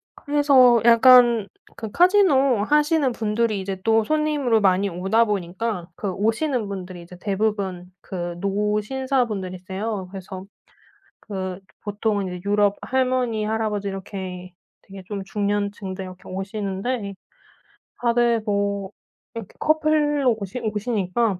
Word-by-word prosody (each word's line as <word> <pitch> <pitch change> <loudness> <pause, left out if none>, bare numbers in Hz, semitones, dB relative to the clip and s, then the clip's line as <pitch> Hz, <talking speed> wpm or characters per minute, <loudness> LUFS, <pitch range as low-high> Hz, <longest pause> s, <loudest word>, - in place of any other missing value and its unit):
그래서 275 -5 +4
약간 235 -2 +6 0.3
그 220 -1 -5
카지노 295 - +4
하시는 295 +1 +2
분들이 220 -2 -1
이제 190 0 -4
또 225 -1 +3
손님으로 295 -6 +1
많이 195 0 +3
오다 190 +6 +2
보니까 195 -1 -3
그 200 -3 -3
오시는 225 - 0
분들이 185 -3 -7
이제 180 +1 -13
대부분 195 -3 -2
그 175 -2 -5
노신사분들이세요. 210 -2 -2
그래서 190 0 -8 0.8
그 190 -2 -5 0.2
보통은 205 -1 -1
이제 180 -1 -6
유럽 205 -1 +3
할머니 255 -4 0
할아버지 215 -2 -1
이렇게 185 -2 -6 0.3
되게 195 -1 -12
좀 200 -2 -4
중년층들 200 -1 -3
이렇게 185 0 -11
오시는데 200 +3 -3 0.9
다들 235 -1 +2
뭐 200 -1 -1 0.4
이렇게 225 -5 -7
커플로 300 -5 +2
오시 200 +5 -5
오시니까 210 -2 -1
210 Hz, 280 characters per minute, -23 LUFS, 190-240 Hz, 0.9 s, 약간